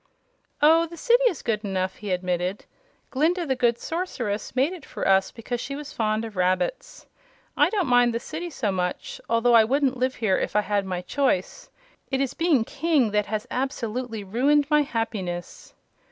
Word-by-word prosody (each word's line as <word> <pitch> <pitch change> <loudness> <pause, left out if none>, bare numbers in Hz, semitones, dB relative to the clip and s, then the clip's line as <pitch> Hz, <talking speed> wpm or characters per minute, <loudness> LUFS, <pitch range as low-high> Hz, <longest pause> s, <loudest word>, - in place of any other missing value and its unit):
"Oh, 325 +2 +6
the 340 +1 -11
city 485 +7 +3
is 355 - -2
good 220 -2 -1
enough," 190 -2 -2
he 210 - -7
admitted. 180 +1 -2 0.5
"Glinda, 335 +6 +1
the 265 -3 0
Good 240 -2 +2
Sorceress, 255 - -4
made 275 +7 +2
it 350 -6 -10
for - - -4
us 195 0 +3
because 240 +1 -5
she 275 - -5
was 295 0 -8
fond 215 0 0
of 220 -2 -9
rabbits. 185 -1 -1 0.5
I - - +4
don't 410 -4 0
mind 245 -2 +4
the 230 - -2
City 330 +7 -6
so 220 -9 -2
much, 180 +5 -3
although 230 +1 +3
I 230 -1 +8
wouldn't 265 +2 +1
live 255 +1 0
here 210 -5 +1
if - - -3
I 210 - +5
had 205 -1 -1
my 180 -1 -3
choice. 275 - -1 0.4
It 265 - 0
is 275 -1 -1
being 325 -8 +2
King 285 -3 +1
that 210 0 +1
has 215 0 -3
absolutely 245 -4 -3
ruined 275 +9 +2
my 300 0 +5
happiness." 215 - -4
240 Hz, 180 wpm, -25 LUFS, 205-285 Hz, 0.5 s, I